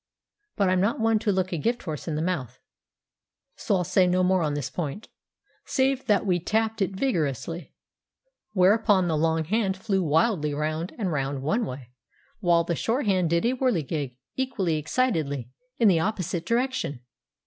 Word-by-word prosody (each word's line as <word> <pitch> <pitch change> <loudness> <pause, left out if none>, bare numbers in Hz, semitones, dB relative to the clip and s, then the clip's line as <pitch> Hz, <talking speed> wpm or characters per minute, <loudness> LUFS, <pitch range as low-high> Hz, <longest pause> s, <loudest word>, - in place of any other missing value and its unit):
But 200 -3 +2
I'm 185 0 +2
not 205 +5 +1
one 225 -1 +3
to 210 -1 +1
look 185 -1 0
a 170 - -1
gift 235 +9 -1
horse 155 -3 -5
in 160 - -1
the 155 - -1
mouth, 135 -9 -3 1.0
so 200 - 0
I'll 180 - +1
say 180 +2 +3
no 180 +1 +2
more 185 0 +3
on 150 -2 0
this 140 -2 -3
point, 170 +7 -5 0.5
save 265 0 0
that 205 -1 +3
we 180 -3 +2
tapped 220 +4 0
it 195 0 0
vigorously; 165 - -2 0.8
whereupon 200 0 +4
the 160 - +1
long 160 +1 +1
hand 195 +2 0
flew 195 -1 0
wildly 155 -1 +1
round 155 +3 -2
and 200 -6 -1
round 135 -2 -2
one 215 - 0
way, 125 -1 -8 0.5
while 170 -4 +3
the 170 - -1
short 230 - -1
hand 185 -4 +2
did 170 +5 +1
a 240 - +3
whirligig, 160 - -1 0.2
equally 195 -11 -1
excitedly, 155 - -1 0.3
in 230 - +4
the 180 -5 +5
opposite 180 -2 -2
direction. 240 - -1
180 Hz, 170 wpm, -26 LUFS, 155-215 Hz, 1.0 s, the